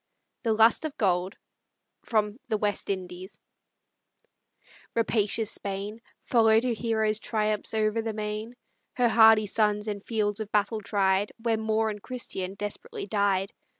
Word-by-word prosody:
THE 230 -3 +1
LUST 225 +5 +4
OF 310 -3 -5
GOLD 185 -2 +1 0.7
From 215 0 0
"The 215 - +1
West 205 -1 -2
Indies" 185 0 -5 1.6
Rapacious 220 -1 +1
Spain 200 +3 -5 0.2
Follow'd 225 -1 +4
her 250 - 0
hero's 220 -1 0
triumphs 215 -1 -1
o'er 215 -1 +2
the 225 0 -3
main, 215 +2 -5 0.4
Her 245 -2 +3
hardy 220 -1 +6
sons 210 0 +1
in 205 -1 -3
fields 210 -2 -1
of 215 -1 -5
battle 210 +1 +1
tried, 195 0 +1
Where 230 0 0
Moor 220 0 0
and 210 -1 -8
Christian 195 -7 -5
desperately 400 - -4
died. 200 -2 0
215 Hz, 135 wpm, -27 LUFS, 205-225 Hz, 1.6 s, hardy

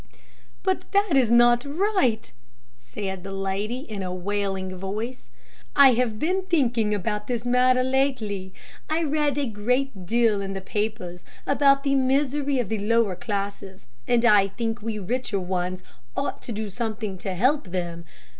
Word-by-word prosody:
"But 375 - -1
that 400 -3 +3
is 255 -4 +4
not 240 +1 +5
right," 290 - 0 0.5
said 180 +10 -6
the 195 - -7
lady 195 +5 -2
in 215 -8 -6
a 185 -1 -3
wailing 190 0 -2
voice. 205 - -5 0.5
"I 275 -2 +8
have 230 -2 0
been 365 - 0
thinking 245 - +1
about 210 +1 -2
this 240 -1 -2
matter 255 +1 +4
lately. 255 -8 0 0.4
I 320 +2 +1
read 295 -2 0
a 285 - +1
great 230 -2 -1
deal 225 -2 +2
in 195 0 -4
the 195 - -3
papers 190 -3 -3 0.2
about 275 -1 +4
the 275 -1 +1
misery 275 +1 +1
of 240 -6 -1
the 220 - -1
lower 215 -2 +2
classes, 200 - -5 0.2
and 240 0 +3
I 205 -4 +6
think 225 +2 -3
we 220 0 -3
richer 210 +1 -2
ones 185 0 -3 0.3
ought 280 - -2
to - - -7
do 215 -1 -4
something 215 -3 -4
to 190 0 -4
help 255 +5 +2
them. 175 -2 -4
225 Hz, 155 wpm, -25 LUFS, 195-260 Hz, 0.5 s, I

